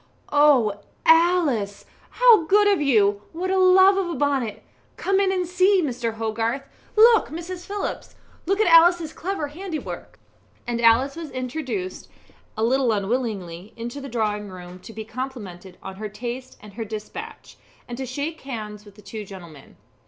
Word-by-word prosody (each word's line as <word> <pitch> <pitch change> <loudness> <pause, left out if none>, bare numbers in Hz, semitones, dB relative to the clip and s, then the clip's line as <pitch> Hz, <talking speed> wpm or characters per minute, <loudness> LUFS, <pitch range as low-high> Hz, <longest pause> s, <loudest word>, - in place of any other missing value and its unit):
"Oh, 265 -9 +4 0.3
Alice, 325 - +3 0.2
how 470 -8 +5
good 410 +4 +4
of 400 -5 +3
you! 205 -7 +3
What 365 +3 -2
a 380 - +2
love 375 +1 +6
of 380 -3 -1
a 340 - -3
bonnet! 275 -7 -1 0.3
Come 390 0 +1
in 390 -1 +2
and 365 -1 0
see 370 +3 +3
Mr. 240 -5 -2
Hogarth. 225 +4 -2 0.3
Look, 450 +1 +6
Mrs. 345 +3 -7
Phillips 405 0 -5 0.3
look 390 +2 +1
at 435 - +4
Alice's 335 -1 +5
clever 355 -5 -4
handiwork." 330 +1 -7 0.5
And 235 -1 -2
Alice 235 +4 +4
was 330 -2 -7
introduced 255 -7 -5 0.5
a 220 - -1
little 255 +1 +2
unwillingly 200 -4 -3
into 240 +5 -6
the 275 - -7
drawing 210 -3 -2
room 180 -1 -10
to 225 - -12
be 220 0 -7
complimented 210 -7 -7
on 190 0 -8
her 215 +1 -5
taste 240 +5 -7
and 210 -1 -12
her 225 - -5
despatch, 225 - -8 0.3
and 240 - -6
to 265 - -3
shake 290 +5 -4
hands 215 -5 -7
with 205 -1 -16
the 210 - -17
two 210 +2 -7
gentlemen. 175 -8 -12
255 Hz, 160 wpm, -23 LUFS, 215-345 Hz, 0.5 s, love